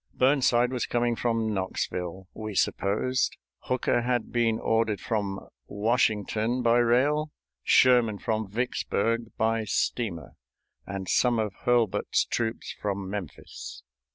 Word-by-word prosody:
Burnside 125 -2 +3
was 125 - -1
coming 120 0 +1
from 115 -1 0
Knoxville, 95 -1 -3
we 110 -2 -6
supposed, 125 +9 0 0.2
Hooker 125 -1 0
had 120 -1 -1
been 115 -2 +2
ordered 110 -2 +1
from 100 -4 -3 0.2
Washington 110 +2 0
by 120 +1 +4
rail, 140 +6 +2 0.3
Sherman 120 -5 +4
from 110 -1 -2
Vicksburg 115 0 -1
by 115 0 +1
steamer, 105 -7 -2 0.5
and 95 -1 -5
some 120 +4 +3
of 105 -3 -1
Hurlbut's 120 -5 +2
troops 115 -1 -3
from 100 -2 -3
Memphis. 70 -9 -7
115 Hz, 115 wpm, -27 LUFS, 100-120 Hz, 0.5 s, by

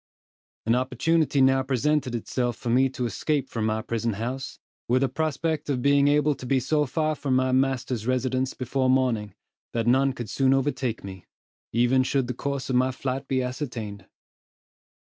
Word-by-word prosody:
An 115 - +3
opportunity 140 +4 +1
now 130 0 +4
presented 130 0 0
itself 120 +1 -2
for 120 - -3
me 130 +2 +4
to 125 -1 -3
escape 140 +4 -1
from 110 -3 -2
my 110 0 -1
prison 115 -1 -1
house, 125 +6 -4 0.3
with 130 +3 +2
a - - +3
prospect 155 +1 -2
of 125 -3 -1
being 140 0 +4
able 150 +1 +3
to 130 - -9
be 135 +1 +3
so 150 +3 +1
far 155 +4 0
from 140 -3 -1
my 130 0 +2
master's 130 -3 0
residence 130 0 0
before 130 +1 0
morning, 120 -6 +1 0.4
that 115 -1 0
none 135 +3 +3
could 120 -5 -6
soon 135 -1 +3
overtake 130 -4 -1
me, 95 -2 -9 0.4
even 120 +3 +3
should 130 0 +1
the 125 - -3
course 140 +2 -3
of 130 - -1
my 130 +1 +3
flight 135 +1 -4
be 130 -1 0
ascertained. 120 -7 -5
130 Hz, 175 wpm, -25 LUFS, 120-135 Hz, 0.4 s, now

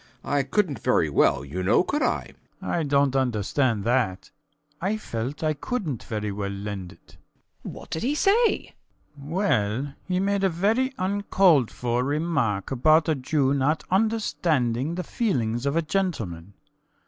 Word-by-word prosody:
I 145 -1 +1
couldnt 155 +1 0
very 80 -11 +1
well, 70 - +3
you 85 +7 -5
know, 95 - +3
could 295 +9 -2
I? - - 0 0.3
SCHUTZMACHER. - - -5
I 170 - +1
dont 140 -1 +2
understand 120 -2 +1
that. 115 -5 0 0.5
I 200 +5 0
felt 125 - -4
that - - -4
I 155 - +2
couldnt 155 - -3
very 105 -2 -4
well 100 0 -3
lend 100 -2 -6
it. - - -22 0.5
WALPOLE. - - -6
What - - -14
did 160 - -2
he 275 +5 0
say? 435 +8 +4
SCHUTZMACHER. 145 0 -10
Well, 135 - 0
he 180 -1 0
made 200 0 0
a 195 - +4
very 215 +10 +1
uncalled 185 - +3
for 120 0 -1
remark 140 - -1
about 155 +5 +4
a - - +4
Jew 135 0 +1
not 140 +3 +1
understanding 170 - +1
the 180 - -3
feelings 125 - -1
of 140 - 0
a 165 - +2
gentleman. 110 - -3
140 Hz, 160 wpm, -25 LUFS, 115-185 Hz, 0.5 s, say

